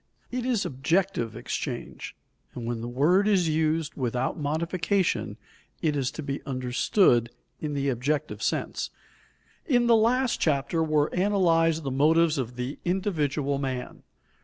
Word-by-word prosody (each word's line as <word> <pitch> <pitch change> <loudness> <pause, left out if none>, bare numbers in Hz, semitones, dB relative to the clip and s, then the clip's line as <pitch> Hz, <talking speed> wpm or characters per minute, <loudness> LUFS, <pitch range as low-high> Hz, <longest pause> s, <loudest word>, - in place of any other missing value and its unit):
It 250 0 -2
is 240 -5 +1
objective 135 - 0
exchange, - - -5 0.4
and 120 - -5
when 115 -1 -3
the 120 - -4
word 160 +11 +3
is 190 -5 +3
used 155 0 0
without 125 0 -1
modification, 170 +5 -1 0.4
it 155 -2 0
is 135 -3 0
to 155 - -6
be 140 0 -4
understood 125 - +2 0.3
in 150 -2 -3
the 140 0 -1
objective 145 +5 -1
sense. - - -2 0.8
In 245 -5 +3
the 235 -1 +6
last 240 +3 +2
chapter 155 +2 +1
were 155 -1 +1
analyzed 165 -4 +2
the 135 - -3
motives 155 +3 +3
of 125 -1 -4
the 125 +3 -4
individual 150 -7 0
man. 130 -2 -4
155 Hz, 135 wpm, -27 LUFS, 135-180 Hz, 0.8 s, the